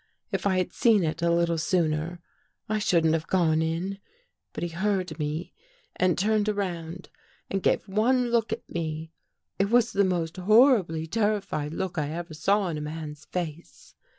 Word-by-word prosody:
If - - 0
I 190 -2 +2
had 185 - -1
seen 220 -5 +4
it 160 +1 -2
a 170 - +2
little 170 -1 +2
sooner, 165 0 0 0.5
I 215 0 0
shouldn't 165 -5 +3
have 165 0 -1
gone 160 -4 +2
in. 170 +5 -2 0.5
But - - -5
he 175 - -1
heard 185 -2 -1
me 155 +3 -3 0.4
and 180 -2 +2
turned 215 +2 +2
around 180 -4 -4 0.4
and 195 - 0
gave - - +1
one 240 +5 +2
look 230 -2 +1
at 225 - -4
me. 160 -1 -4 0.5
It 200 +1 +2
was 240 0 +4
the 200 - +3
most 175 -3 -1
horribly 200 - +4
terrified 200 -6 -1
look 180 -2 -2
I 145 -1 -1
ever 170 +1 -5
saw 195 +4 +1
in 155 -2 -3
a - - -5
man's 150 0 -6
face. 170 -2 -6
175 Hz, 170 wpm, -27 LUFS, 160-200 Hz, 0.5 s, seen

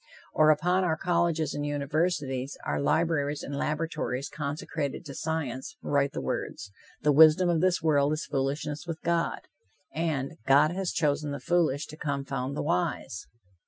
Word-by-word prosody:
Or 155 0 +5
upon 180 +5 +3
our 160 -3 +1
colleges 170 -2 +1
and 145 - -3
universities, 145 -2 -1
our - - -1
libraries 150 -1 +1
and 140 - -5
laboratories 150 -3 -2
consecrated 150 -1 -4
to 140 - -7
science, 145 -5 -3
write 140 -1 +1
the - - -3
words: 100 - -4 0.3
"The 150 - +4
wisdom 160 +4 +7
of 165 -2 +2
this 185 -2 +2
world 145 -2 +3
is 155 - -3
foolishness 145 +3 -2
with 165 -2 -4
God," 170 0 0 0.5
and 155 -4 -2
"God 145 +3 +5
has 185 0 -2
chosen 150 -2 0
the 140 0 -4
foolish 155 -1 +1
to 155 - -11
confound 140 -2 -3
the - - -1
wise." 165 - -2
150 Hz, 155 wpm, -28 LUFS, 140-165 Hz, 0.5 s, wisdom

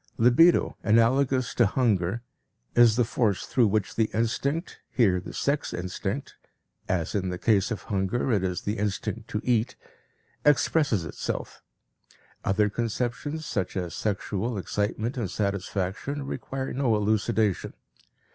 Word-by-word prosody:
Libido, 125 +10 +5
analogous 125 +3 +3
to - - +4
hunger, 105 -2 +1 0.5
is 120 -2 +6
the 120 - +3
force 110 -4 0
through 120 -4 +3
which 105 0 0
the 110 -1 +1
instinct, 140 - -1
here 95 -8 +3
the 90 - -8
sex 140 +1 -1
instinct 90 +1 -4 0.6
(as 85 -4 0
in 95 -2 -1
the 90 - -3
case 100 0 +2
of 115 - -4
hunger 100 +6 -1
it 100 -4 +2
is 90 -2 -1
the 105 +1 -3
instinct 105 +2 -2
to 105 - -2
eat) 120 0 +1 0.7
expresses 145 - +3
itself. 75 - -5 0.8
Other 105 +2 +2
conceptions, 120 +8 -3
such 95 -6 -2
as 90 -2 -3
sexual 105 +2 -2
excitement 105 +5 -2
and 110 -7 -2
satisfaction, 100 +7 -2
require 135 0 -4
no 125 -4 +2
elucidation. 105 -1 +1
110 Hz, 130 wpm, -27 LUFS, 100-125 Hz, 0.8 s, is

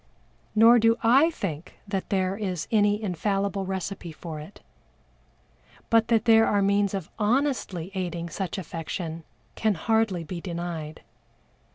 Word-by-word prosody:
Nor 230 +2 +7
do 230 +1 +4
I 270 +8 +6
think 175 - -6
that 195 -2 -3
there 190 -1 0
is 185 -5 -3
any 210 -1 +3
infallible 195 +1 -1
recipe 190 -2 -4
for 155 0 -7
it, 150 - -12 1.3
but 225 -1 +4
that 225 -1 +2
there 225 -1 +6
are 205 -1 +2
means 200 0 +2
of 190 -5 -5
honestly 215 - 0
aiding 175 -3 -3
such 185 +3 -4
affection 165 -1 -5 0.3
can 215 -2 +1
hardly 215 -1 +1
be 170 +2 -6
denied. 170 -4 -5
195 Hz, 135 wpm, -26 LUFS, 170-220 Hz, 1.3 s, Nor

